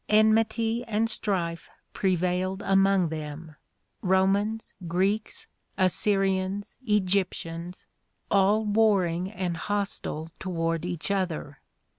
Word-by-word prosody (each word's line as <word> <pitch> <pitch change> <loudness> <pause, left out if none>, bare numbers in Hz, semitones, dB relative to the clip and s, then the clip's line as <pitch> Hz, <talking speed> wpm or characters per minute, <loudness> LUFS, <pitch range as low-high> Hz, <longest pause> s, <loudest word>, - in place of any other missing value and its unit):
Enmity 225 +2 +3
and 225 0 +1
strife 170 -6 -2 0.2
prevailed 185 +1 0
among 195 -2 +3
them, 155 0 -6 0.2
— - - -48 0.2
Romans, 195 +4 +1
Greeks, 195 +5 0 0.3
Assyrians, 195 +1 +1
Egyp 200 -2 +3
tians, 170 +2 -7 0.2
— - - -45
all 205 +2 +4
warring 195 -5 +2
and 180 -4 -2
hostile 195 -5 -3
toward 165 -2 -1
each 180 +1 -2
other. 170 -7 -2
190 Hz, 100 wpm, -27 LUFS, 175-205 Hz, 0.3 s, all